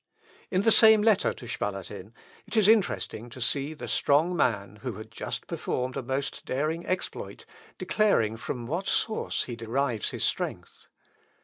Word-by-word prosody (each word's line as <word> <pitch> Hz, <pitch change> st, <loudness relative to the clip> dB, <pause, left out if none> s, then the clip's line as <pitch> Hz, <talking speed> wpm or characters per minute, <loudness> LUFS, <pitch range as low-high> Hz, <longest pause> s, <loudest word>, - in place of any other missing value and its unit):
In 185 Hz, +1 st, +1 dB
the 225 Hz, -, +5 dB
same 220 Hz, -2 st, +7 dB
letter 215 Hz, -3 st, +4 dB
to 125 Hz, -, -10 dB
Spalatin, 100 Hz, +1 st, -5 dB, 0.3 s
it -, -, -4 dB
is 210 Hz, -2 st, +5 dB
interesting 195 Hz, -, +2 dB
to 125 Hz, -, -10 dB
see 140 Hz, +5 st, 0 dB
the -, -, -7 dB
strong 155 Hz, +5 st, +2 dB
man, 105 Hz, -, 0 dB
who 125 Hz, +1 st, -5 dB
had 110 Hz, +2 st, -10 dB
just -, -, -5 dB
performed 130 Hz, 0 st, -3 dB
a 135 Hz, -, -2 dB
most 135 Hz, +2 st, -3 dB
daring 155 Hz, +5 st, -1 dB
exploit, 185 Hz, 0 st, -4 dB, 0.3 s
declaring 115 Hz, -, +2 dB
from 120 Hz, +1 st, -5 dB
what 170 Hz, +10 st, -3 dB
source 220 Hz, -, 0 dB
he 120 Hz, -, -6 dB
derives 115 Hz, +1 st, -1 dB
his -, -, -4 dB
strength. -, -, -3 dB
135 Hz, 155 wpm, -28 LUFS, 115-180 Hz, 0.3 s, same